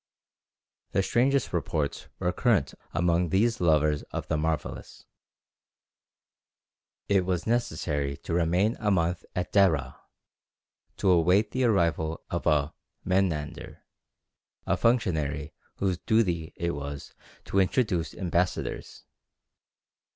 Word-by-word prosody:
The 95 - +2
strangest 130 +4 +1
reports 80 -4 -2
were 90 -1 0
current 100 - +2 0.2
among 85 0 +1
these 115 +5 +2
lovers 75 -3 +3
of - - -5
the 80 - +1
marvellous. 80 -1 -3 2.0
It 100 -2 +3
was 90 -1 -1
necessary 75 - -1
to - - -6
remain 90 +6 +2
a 105 - 0
month 90 -2 +1
at 90 0 -3
Déra, 95 -7 +2 1.0
to 95 - +1
await 90 +5 +3
the 130 0 +1
arrival 85 -7 +1
of 85 - -2
a 75 -1 +2 0.3
"Mehnandar," 80 -5 -1 0.8
a - - +2
functionary 80 - 0 0.2
whose 95 -3 -1
duty 90 -8 +1
it 85 0 -1
was 70 -2 -6 0.3
to 100 - +1
introduce 95 - +1
ambassadors. 90 0 -2
85 Hz, 105 wpm, -27 LUFS, 80-100 Hz, 2.0 s, lovers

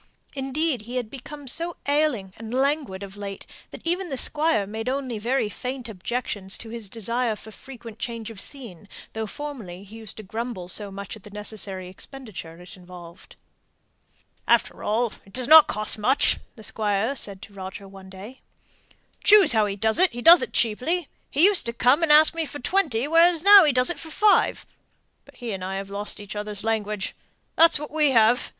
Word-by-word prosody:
Indeed, 270 0 -1
he 250 - -5
had 240 -3 -3
become 280 +2 -10
so 335 +6 -1
ailing 285 -10 0
and 225 0 -8
languid 270 -8 -1
of 195 0 -9
late, 200 -1 -7 0.2
that - - -12
even 355 +2 -1
the 270 - -3
Squire 295 -8 +2
made 220 +4 -5
only 260 -4 -3
very 240 +2 0
faint 250 +3 -6
objections 205 -1 -4
to 225 - -10
his 225 -3 -5
desire 230 +2 -1
for 220 +1 -13
frequent 230 -2 -12
change 230 -2 -5
of 200 -3 -4
scene, 210 - -7 0.2
though 220 0 -4
formerly 215 -10 -8
he 210 +3 -12
used 220 -2 -7
to 215 - -8
grumble 220 -2 -5
so 205 +1 0
much 200 +1 -8
at 215 - -14
the 210 - -13
necessary 205 -2 -4
expenditure 185 -5 -9
it 180 +4 -12
involved. 180 -2 -14 1.1
"After - - +2
all, 225 +2 0
it 195 - -20
doesn't 300 +6 +7
cost 215 +1 -1
much," 255 +7 +2 0.2
the 220 - -13
Squire 215 +4 -1
said 200 -7 -2
to 205 - -13
Roger 190 0 -8
one 195 -1 -13
day. 200 +7 -11 0.8
"Choose 415 - +7
how 215 -2 +3
he 200 - -3
does 220 +2 +1
it, 370 0 +5
he 240 0 -7
does 340 +1 +9
it - - -3
cheaply; 275 +10 +1 0.2
he 300 +6 +4
used 395 -11 +3
to 235 - -2
come 250 +6 +3
and 330 -2 +2
ask 305 +2 +7
me 330 -2 -3
for 290 - -7
twenty, 285 -5 0
where 335 +2 +4
now 400 -2 +9
he 300 - +3
does 250 +4 +2
it - - -6
for 320 - -8
five. 415 +6 +2 0.6
But - - -19
he 240 -3 -6
and 190 -2 -5
I 190 +1 -4
have 195 0 -6
lost 205 +1 -5
each 205 0 -9
other's 210 -1 -6
language, 210 -2 -2 0.4
that's 330 0 +5
what 300 0 -8
we 305 -1 +2
have! 235 -1 +3
230 Hz, 195 wpm, -24 LUFS, 205-280 Hz, 1.1 s, does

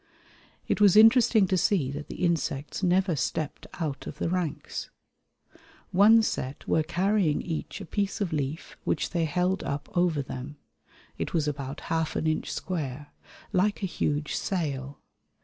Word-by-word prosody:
It - - 0
was 205 -2 +7
interesting 225 -1 +7
to 185 0 +1
see 170 -8 +2
that 145 +1 -6
the 180 - -2
insects 150 -3 -1
never 185 -1 +2
stepped 150 +1 -3
out 145 -5 -3
of - - -7
the - - -1
ranks. 175 -4 -3 1.0
One 215 +4 +6
set 130 -9 -3
were 160 - +3
carrying 175 0 +1
each 165 +2 -4
a - - -6
piece 200 +4 -2
of 195 -6 -1
leaf 145 +1 -3
which - - -1
they 170 -2 +1
held 180 +4 0
up 140 +5 -5
over 175 -5 +2
them 135 +3 -7 0.6
(it - - -3
was 155 -2 +1
about 140 -2 -4
half 160 -1 -1
an - - -1
inch 155 0 0
square) 150 -5 -4 0.4
like 205 +3 +1
a - - +3
huge 150 -4 -1
sail. 140 -7 -2
165 Hz, 155 wpm, -27 LUFS, 145-190 Hz, 1.0 s, was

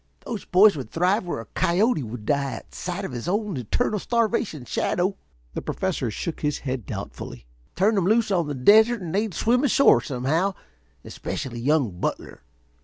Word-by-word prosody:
Those 225 -5 -5
boys 195 +2 +6
would 130 -7 -6
thrive 185 +4 +1
where 170 - -3
a - - -11
coyote 185 +2 +1
would 115 -2 -7
die 140 +1 0
at - - -10
sight 180 +2 -4
of - - -5
his 120 +4 -6
own 205 0 -1
eternal 210 - -1
starvation 220 - -1
shadow." 185 +9 0 0.4
The - - -4
Professor 175 -10 -2
shook 160 +9 -4
his 150 -1 -1
head 130 -6 -3
doubtfully. - - -7 0.3
"Turn 205 +5 +3
'em 185 - +2
loose 220 0 +2
on 175 -5 +1
the 145 - -3
desert 220 - +5
and 165 -1 -5
they'd 205 -2 -1
swim 245 +4 +2
ashore 275 0 +5
somehow. 155 +9 -1 0.5
Especially 125 -4 -5
young 125 - +1
Butler. - - -4
175 Hz, 175 wpm, -24 LUFS, 135-210 Hz, 0.5 s, boys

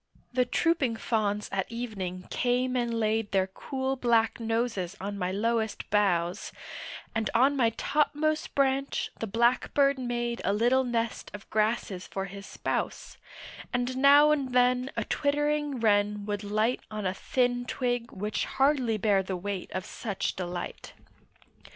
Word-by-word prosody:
The 250 0 +3
trooping 270 -2 +1
fawns 210 -2 -1
at 195 +3 -2
evening 195 -6 -4
came 250 +1 +1
and 240 -1 0
laid 220 -1 0
Their 190 -1 +3
cool 265 +7 -3
black 235 -3 +2
noses 225 -5 -1
on 200 +2 -4
my 185 -2 -2
lowest 220 +2 -1
boughs, 180 -4 +1 0.6
And 225 -1 0
on 270 +4 +5
my 240 -4 +3
topmost 300 +1 0
branch 275 0 +1
the 225 - -2
blackbird 255 +5 +2
made 240 -1 -2
A 200 - +1
little 240 +5 +3
nest 235 -2 -2
of 205 - -11
grasses 215 -3 0
for 195 0 -3
his 195 +1 -9
spouse, - - -3 0.5
And 245 +1 -1
now 285 +2 +7
and 275 -4 0
then 250 +1 +3
a 230 - +1
twittering 295 +1 0
wren 205 -2 +2
would 205 0 -3
light 215 +4 0
On 215 -2 -4
a 185 - +1
thin 245 +3 0
twig 245 -2 -1
which 210 +2 -2
hardly 265 -5 +2
bare 205 -2 +3
the 190 -1 -4
weight 195 0 -4
of 185 - -3
such 205 -4 -3
delight. 175 -1 -5
230 Hz, 145 wpm, -28 LUFS, 205-255 Hz, 0.6 s, now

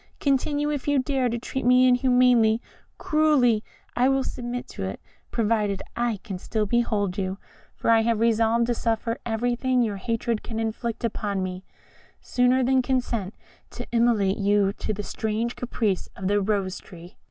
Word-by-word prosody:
Continue, 290 +2 +1
if 290 -2 -4
you 290 -1 +3
dare, 260 -1 +1
to 235 - -2
treat 265 +3 -4
me 250 +1 +5
inhumanly, 250 -3 +4 0.4
cruelly 285 -8 +3 0.3
I 250 +2 +3
will 270 0 +2
submit 245 -1 -5
to - - -6
it, 95 - -5 0.3
provided 210 -3 0
I 235 -2 0
can 190 -3 -6
still 215 +2 -1
behold 205 -4 0
you; 190 0 -2 0.4
for - - +1
I 225 -1 +5
have 230 -1 +1
resolved 230 0 +3
to 240 - 0
suffer 230 0 -1
everything 245 +2 +1
your 210 -3 -2
hatred 230 +2 -2
can 225 -1 -5
inflict 225 +1 -3
upon 205 -4 -2
me, 185 0 -5 0.5
sooner 250 +1 +2
than 260 +1 +3
consent 240 -6 -2 0.3
to - - -7
immolate 230 -5 +2
you 200 0 +2
to 215 - -4
the 205 0 -4
strange 220 +3 -2
caprice 220 -6 -2
of 185 - -4
the 205 +1 +2
Rose 195 -2 -1
tree." 175 0 -14
230 Hz, 165 wpm, -25 LUFS, 205-250 Hz, 0.5 s, me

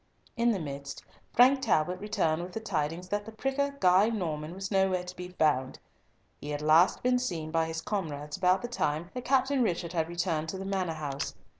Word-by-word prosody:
In 235 0 +2
the 210 - 0
midst, 140 -3 -6 0.3
Frank 260 +3 +5
Talbot 180 -5 +1
returned 185 -6 0
with 180 +1 -7
the 225 - -3
tidings 175 -3 -2
that 205 +1 -1
the 225 - -9
pricker 275 +5 -1
Guy 185 +4 +5
Norman 165 -6 -3
was 195 +1 -5
nowhere 190 -2 +2
to 180 0 -8
be 180 0 -6
found. 150 -7 +1 0.6
He 145 - -7
had 145 0 -3
last 160 +4 +4
been 250 0 +3
seen 165 -10 -3
by 165 0 +1
his 160 0 -4
comrades 150 -7 -3
about 185 +2 +2
the - - -2
time 170 -7 -2
that 250 -1 -6
Captain 270 0 +2
Richard 175 -6 -1
had 165 -1 0
returned 170 -2 -1
to 190 - -4
the 190 - -6
Manor 190 -4 -1
house. 140 -3 -4
180 Hz, 200 wpm, -29 LUFS, 155-210 Hz, 0.6 s, Frank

